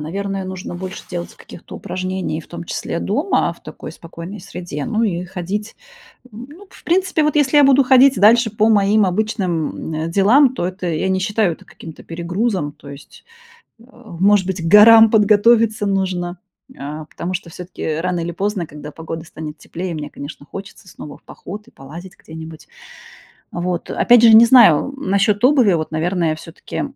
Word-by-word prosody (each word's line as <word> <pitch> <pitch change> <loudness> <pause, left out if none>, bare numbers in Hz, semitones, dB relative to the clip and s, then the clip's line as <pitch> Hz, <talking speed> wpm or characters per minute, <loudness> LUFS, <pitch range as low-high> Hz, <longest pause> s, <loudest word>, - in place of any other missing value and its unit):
наверное, 195 +4 -4
нужно 185 -1 -7
больше 185 +1 -7
делать 175 -1 -6
каких-то - - -13
упражнений, 185 -3 -4
и - - -5
в - - -18
том 170 0 -8
числе 170 - -4
дома, 290 - 0
в - - -20
такой - - -10
спокойной 170 +4 -10
среде. 175 -6 -7
Ну 220 +1 -1
и 180 -5 -1
ходить, 190 +4 -6 0.6
м, 235 +4 -10
ну, 370 +7 -14
в - - -17
принципе, 350 -2 +1
вот 300 0 0
если 290 0 +2
я 290 - +6
буду 275 0 +5
ходить 265 +1 +5
дальше 225 +3 +5
по 215 +1 +1
моим 205 0 +3
обычным, 180 -5 -2
м, 165 - -4
делам, 245 +9 +4
то 175 - -2
это, 185 0 -6
я 170 +3 -1
не 190 0 0
считаю 205 -2 0
это - - -12
каким-то 160 -2 -12
перегрузом. 175 -1 -3
То 145 - -16
есть, 140 0 -14 0.6
а, 235 -7 -15
может 195 0 +3
быть, 190 -3 -4
к - - -6
горам 225 +3 +8
подготовиться 220 +1 +3
нужно, 185 -2 -2 0.4
а, 150 +2 -7
потому 175 +4 -6
что 175 -2 -6
всё-таки 180 +2 -8
рано 180 0 -2
или 170 +1 -4
поздно, 195 -1 -3
когда 150 0 -10
погода 160 +1 -8
станет 155 -1 -9
теплее, 175 0 -6
мне, 150 -1 -6
конечно, 145 0 -10
хочется 195 0 -10
снова 150 -3 -11
в - - -36
поход 210 +4 -10
и - - -18
полазить 170 +7 -12
где-нибудь. 160 0 -11 0.9
Вот, 175 0 -4
опять 240 -1 +4
же, 225 -1 +7
не 230 +1 +9
знаю, 235 - +5
м, 275 -8 -6
насчёт 205 +2 +1
обуви, 255 -8 +4
вот, 155 -1 -3
наверное, 165 0 -1
всё-таки 165 +1 -8
190 Hz, 180 wpm, -18 LUFS, 170-220 Hz, 0.9 s, не